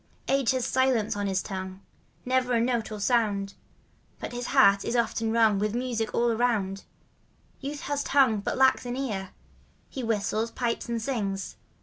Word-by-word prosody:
Age 270 Hz, -3 st, +2 dB
has 260 Hz, -2 st, +1 dB
silence 260 Hz, -6 st, +1 dB
on 205 Hz, 0 st, -2 dB
his 190 Hz, -1 st, 0 dB
tongue 190 Hz, -1 st, -6 dB, 0.2 s
— -, -, -37 dB
Never 255 Hz, 0 st, +1 dB
a 235 Hz, -, +3 dB
note 235 Hz, -2 st, 0 dB
or 215 Hz, -, -5 dB
sound; 205 Hz, -3 st, +1 dB, 0.7 s
But -, -, -5 dB
his 245 Hz, 0 st, -4 dB
heart 200 Hz, -8 st, +5 dB
is 240 Hz, -, -2 dB
often 230 Hz, -1 st, 0 dB
wrung 220 Hz, -3 st, +3 dB
By 210 Hz, -, +1 dB
music 235 Hz, 0 st, -2 dB
all 235 Hz, 0 st, +2 dB
around. 220 Hz, -5 st, 0 dB, 0.7 s
Youth 285 Hz, +1 st, -5 dB
has 285 Hz, 0 st, -2 dB
tongue, 265 Hz, -8 st, +3 dB
but 200 Hz, -, -3 dB
lacks 260 Hz, -1 st, +3 dB
an 245 Hz, -, -3 dB
ear 205 Hz, -8 st, -3 dB, 0.3 s
— -, -, -35 dB
He 265 Hz, -, -5 dB
whistles, 220 Hz, 0 st, 0 dB
pipes 235 Hz, 0 st, -2 dB
and 235 Hz, -1 st, -1 dB
sings. 205 Hz, -6 st, -3 dB
230 Hz, 180 wpm, -27 LUFS, 205-255 Hz, 0.7 s, heart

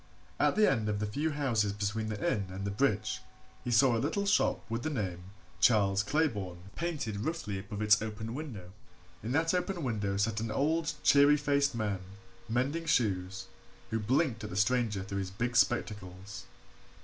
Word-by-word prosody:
At -, -, +3 dB
the 215 Hz, 0 st, +5 dB
end 110 Hz, -5 st, +1 dB
of 105 Hz, -, 0 dB
the 105 Hz, -, -1 dB
few 145 Hz, +10 st, -1 dB
houses 120 Hz, -9 st, 0 dB
between 105 Hz, +2 st, -2 dB
the 110 Hz, -, -3 dB
inn 100 Hz, -3 st, 0 dB
and 95 Hz, +1 st, -5 dB
the 100 Hz, -, -1 dB
bridge 105 Hz, -2 st, 0 dB, 0.4 s
he -, -, -4 dB
saw 120 Hz, +1 st, +5 dB
a 115 Hz, -, 0 dB
little 180 Hz, +9 st, -1 dB
shop 205 Hz, +1 st, +2 dB
with 115 Hz, +1 st, -3 dB
the 155 Hz, -, -2 dB
name 95 Hz, -, -3 dB, 0.3 s
Charles 100 Hz, -4 st, +4 dB
Claybourne 100 Hz, -, -2 dB
painted 150 Hz, -12 st, -3 dB
roughly 155 Hz, -, -3 dB
above 105 Hz, +1 st, -5 dB
its 105 Hz, +1 st, +5 dB
open 110 Hz, +1 st, -5 dB
window. 120 Hz, -, -7 dB, 0.5 s
In 110 Hz, -, -4 dB
that 165 Hz, +3 st, +2 dB
open 180 Hz, -1 st, -1 dB
window 105 Hz, -6 st, -1 dB
sat 105 Hz, +1 st, 0 dB
an 115 Hz, 0 st, -3 dB
old, 155 Hz, +7 st, +1 dB
cheery 145 Hz, +1 st, +6 dB
faced 140 Hz, -2 st, +1 dB
man, 105 Hz, -4 st, -1 dB, 0.5 s
mending 135 Hz, +8 st, 0 dB
shoes, 95 Hz, -6 st, 0 dB, 0.5 s
who 110 Hz, -, 0 dB
blinked 115 Hz, +1 st, +1 dB
at 105 Hz, -, -5 dB
the 90 Hz, -, -6 dB
stranger 105 Hz, -1 st, +1 dB
through 100 Hz, 0 st, -4 dB
his 95 Hz, -1 st, -3 dB
big 120 Hz, +6 st, -3 dB
spectacles. 100 Hz, -5 st, -1 dB
110 Hz, 175 wpm, -31 LUFS, 100-140 Hz, 0.5 s, cheery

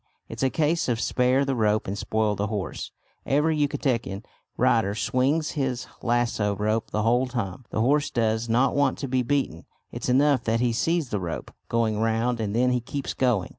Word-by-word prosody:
It's -, -, -7 dB
a 135 Hz, -, +3 dB
case 160 Hz, +1 st, +1 dB
of 115 Hz, -2 st, 0 dB
spare 130 Hz, +3 st, +2 dB
the 135 Hz, -, 0 dB
rope 110 Hz, -2 st, +1 dB
and 95 Hz, -, -2 dB
spoil 110 Hz, +1 st, 0 dB
the 100 Hz, +1 st, -1 dB
horse. 100 Hz, -3 st, -4 dB, 0.3 s
Every 150 Hz, +3 st, +2 dB
Yucatecan 120 Hz, -8 st, -1 dB, 0.3 s
rider 105 Hz, -3 st, +2 dB
swings 135 Hz, +8 st, +1 dB
his 130 Hz, -5 st, -2 dB, 0.2 s
lassoo 115 Hz, -4 st, +1 dB
rope 110 Hz, +2 st, 0 dB
the 105 Hz, -, -1 dB
whole 120 Hz, +3 st, +2 dB
time. 115 Hz, -2 st, -4 dB
The 110 Hz, -, -1 dB
horse 145 Hz, +5 st, +2 dB
does 115 Hz, -1 st, 0 dB
not 125 Hz, +4 st, +2 dB
want 145 Hz, 0 st, +2 dB
to 140 Hz, -, -4 dB
be 130 Hz, 0 st, +1 dB
beaten; 125 Hz, -, -1 dB, 0.3 s
it's -, -, -4 dB
enough 135 Hz, 0 st, +3 dB
that 115 Hz, 0 st, +1 dB
he 120 Hz, -1 st, +1 dB
sees 165 Hz, +3 st, 0 dB
the 105 Hz, -, -1 dB
rope 85 Hz, -3 st, -5 dB, 0.2 s
going 110 Hz, -2 st, +1 dB
round, 115 Hz, +2 st, +1 dB
and 105 Hz, -1 st, -2 dB
then 125 Hz, +1 st, +3 dB
he 125 Hz, -1 st, +1 dB
keeps 140 Hz, +3 st, -4 dB
going. 125 Hz, -8 st, +1 dB
120 Hz, 190 wpm, -25 LUFS, 110-135 Hz, 0.3 s, a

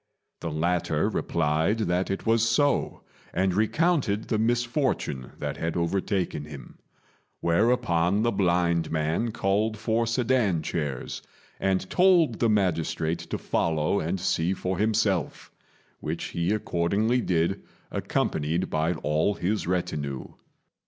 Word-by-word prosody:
The 85 Hz, -, -4 dB
latter 85 Hz, +3 st, 0 dB
replied 80 Hz, +5 st, 0 dB
that 90 Hz, -2 st, 0 dB
it 95 Hz, -, -3 dB
was 115 Hz, 0 st, +3 dB
so, 145 Hz, +4 st, +1 dB, 0.3 s
and 95 Hz, -1 st, +2 dB
recounted 115 Hz, -, +1 dB
the 110 Hz, -, +1 dB
misfortune 120 Hz, -, 0 dB
that -, -, -4 dB
had 85 Hz, +1 st, -2 dB
overtaken 90 Hz, -2 st, -1 dB
him; 75 Hz, -3 st, -11 dB, 0.6 s
whereupon 90 Hz, 0 st, +2 dB
the 120 Hz, -, +2 dB
blind 85 Hz, -3 st, +1 dB
man 80 Hz, +9 st, 0 dB
called 105 Hz, +3 st, 0 dB
for 115 Hz, +2 st, 0 dB
sedan 115 Hz, -8 st, +1 dB
chairs, 75 Hz, -6 st, -3 dB, 0.4 s
and 95 Hz, -1 st, 0 dB
told 175 Hz, -, +4 dB
the 115 Hz, -, +3 dB
magistrate 85 Hz, -5 st, 0 dB
to -, -, -4 dB
follow 80 Hz, +4 st, 0 dB
and 85 Hz, +4 st, -2 dB
see 85 Hz, +2 st, 0 dB
for 95 Hz, 0 st, -3 dB
himself, 105 Hz, -6 st, 0 dB, 0.5 s
which 80 Hz, +2 st, -4 dB
he 85 Hz, +3 st, -1 dB
accordingly 105 Hz, +4 st, +1 dB
did, 85 Hz, +1 st, 0 dB, 0.3 s
accompanied 80 Hz, +4 st, -1 dB
by 80 Hz, +2 st, +1 dB
all 80 Hz, +5 st, 0 dB
his 100 Hz, +2 st, -1 dB
retinue. 75 Hz, -7 st, -2 dB
95 Hz, 120 wpm, -26 LUFS, 80-110 Hz, 0.6 s, told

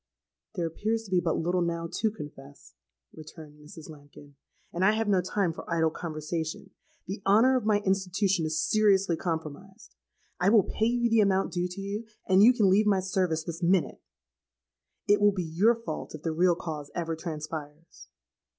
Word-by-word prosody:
'—'There 175 Hz, -3 st, -1 dB
appears 220 Hz, +7 st, -2 dB
to 200 Hz, -, -13 dB
be 180 Hz, -, +3 dB
but 170 Hz, -2 st, -1 dB
little 175 Hz, +2 st, 0 dB
now 170 Hz, -1 st, -2 dB
to 220 Hz, -, 0 dB
confess,' 145 Hz, -8 st, -12 dB, 0.4 s
returned 155 Hz, -1 st, -12 dB
Mrs. 150 Hz, +1 st, -12 dB
Lambkin; 145 Hz, -1 st, -14 dB, 0.4 s
'and 175 Hz, -, -1 dB
I 210 Hz, +3 st, +5 dB
have 220 Hz, 0 st, -1 dB
no 195 Hz, -3 st, +3 dB
time 180 Hz, -1 st, -1 dB
for 165 Hz, -, -10 dB
idle 160 Hz, -1 st, +2 dB
conversation. 155 Hz, 0 st, -5 dB, 0.3 s
The 195 Hz, +3 st, -6 dB
honour 225 Hz, +7 st, +4 dB
of 240 Hz, -4 st, -1 dB
my 205 Hz, -1 st, +3 dB
institution 190 Hz, -2 st, 0 dB
is 155 Hz, 0 st, -2 dB
seriously 195 Hz, -4 st, +3 dB
compromised: 165 Hz, +5 st, -6 dB, 0.5 s
I 180 Hz, +2 st, +3 dB
will 215 Hz, -2 st, +5 dB
pay 220 Hz, -, -1 dB
you 240 Hz, 0 st, +1 dB
the 225 Hz, -1 st, +3 dB
amount 195 Hz, -1 st, +1 dB
due 175 Hz, -1 st, -1 dB
to 180 Hz, +2 st, -9 dB
you, 205 Hz, +3 st, -5 dB, 0.2 s
and 190 Hz, 0 st, +5 dB
you 230 Hz, +4 st, +8 dB
can 220 Hz, -5 st, +2 dB
leave 205 Hz, +3 st, +3 dB
my 200 Hz, -2 st, +3 dB
service 185 Hz, -4 st, -1 dB
this 170 Hz, +1 st, -7 dB
minute. 180 Hz, +1 st, +1 dB, 1.1 s
It 205 Hz, 0 st, +3 dB
will 205 Hz, 0 st, +5 dB
be 185 Hz, -2 st, -2 dB
your 180 Hz, +9 st, +2 dB
fault 225 Hz, -9 st, -7 dB
if 155 Hz, -, -11 dB
the 165 Hz, -, -1 dB
real 175 Hz, +2 st, +3 dB
cause 155 Hz, -4 st, -6 dB
ever 165 Hz, -2 st, -2 dB
transpires.' 155 Hz, -1 st, -8 dB
180 Hz, 180 wpm, -28 LUFS, 160-205 Hz, 1.1 s, you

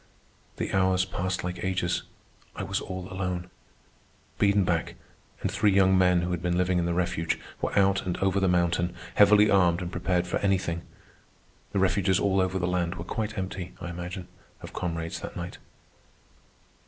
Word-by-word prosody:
The -, -, -3 dB
hours 95 Hz, -1 st, +3 dB
passed 95 Hz, 0 st, -2 dB
like 90 Hz, 0 st, -4 dB
ages. 90 Hz, -2 st, 0 dB, 0.5 s
I -, -, -4 dB
was -, -, -2 dB
all 95 Hz, -1 st, -6 dB
alone. 90 Hz, -1 st, -3 dB, 0.9 s
Biedenbach, 100 Hz, -4 st, +2 dB, 0.5 s
and -, -, 0 dB
three 105 Hz, -, +3 dB
young 95 Hz, -1 st, +5 dB
men 90 Hz, -1 st, +4 dB
who 90 Hz, +1 st, -2 dB
had 90 Hz, -2 st, -2 dB
been 90 Hz, -1 st, 0 dB
living 90 Hz, 0 st, +2 dB
in 85 Hz, -, 0 dB
the 85 Hz, -, 0 dB
refuge, 90 Hz, -2 st, 0 dB, 0.2 s
were -, -, -1 dB
out 100 Hz, 0 st, +4 dB
and 90 Hz, -, -1 dB
over 95 Hz, 0 st, +1 dB
the 95 Hz, -, +2 dB
mountain, 85 Hz, 0 st, +1 dB, 0.2 s
heavily 105 Hz, +1 st, +6 dB
armed 90 Hz, -3 st, +4 dB
and 90 Hz, -1 st, -4 dB
prepared 90 Hz, -1 st, 0 dB
for 90 Hz, -, -1 dB
anything. 95 Hz, -4 st, 0 dB, 0.9 s
The 100 Hz, -, -2 dB
refuges 95 Hz, 0 st, +2 dB
all 95 Hz, -1 st, +2 dB
over 95 Hz, 0 st, 0 dB
the 90 Hz, -, -1 dB
land 90 Hz, -1 st, 0 dB
were 85 Hz, -, -6 dB
quite 110 Hz, +2 st, -3 dB
empty, 95 Hz, -1 st, -4 dB
I 85 Hz, -, -5 dB
imagine, 90 Hz, +1 st, -6 dB, 0.4 s
of -, -, -9 dB
comrades 85 Hz, -2 st, -3 dB
that -, -, -7 dB
night. 85 Hz, 0 st, -6 dB
90 Hz, 170 wpm, -27 LUFS, 90-95 Hz, 0.9 s, heavily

